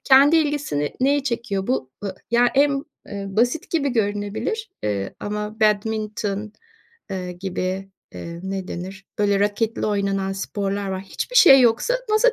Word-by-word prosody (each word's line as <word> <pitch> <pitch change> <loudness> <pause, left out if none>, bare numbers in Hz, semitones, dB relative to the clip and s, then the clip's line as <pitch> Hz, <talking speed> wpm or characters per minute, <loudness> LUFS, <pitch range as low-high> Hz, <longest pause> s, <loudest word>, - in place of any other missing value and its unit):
Kendi 280 +4 +7
ilgisini 290 - 0
neyi 275 +1 +2
çekiyor 230 -6 -2
bu 185 - -1
ı 195 -2 -3 0.2
ya, 240 +1 +5
en, 280 0 +3 0.2
eee, 200 -1 -5
basit 245 - 0
gibi 300 -4 +1
görünebilir, 215 - -2
eee, 100 -2 -2
ama 210 +1 -4
badminton, 215 -1 0 0.6
eee, 180 -2 -4
gibi, 185 +1 -3 0.2
eee, 170 0 -7
ne 190 -1 -4
denir? 190 +2 -6
Böyle 205 -1 +2
raketli 210 +3 0
oynanan 195 -2 0
sporlar 200 0 -3
var. 190 0 -3
Hiçbir - - -4
şey 270 - +9
yoksa 245 - +3 0.2
masa 435 +4 +4
210 Hz, 140 wpm, -22 LUFS, 195-260 Hz, 0.6 s, şey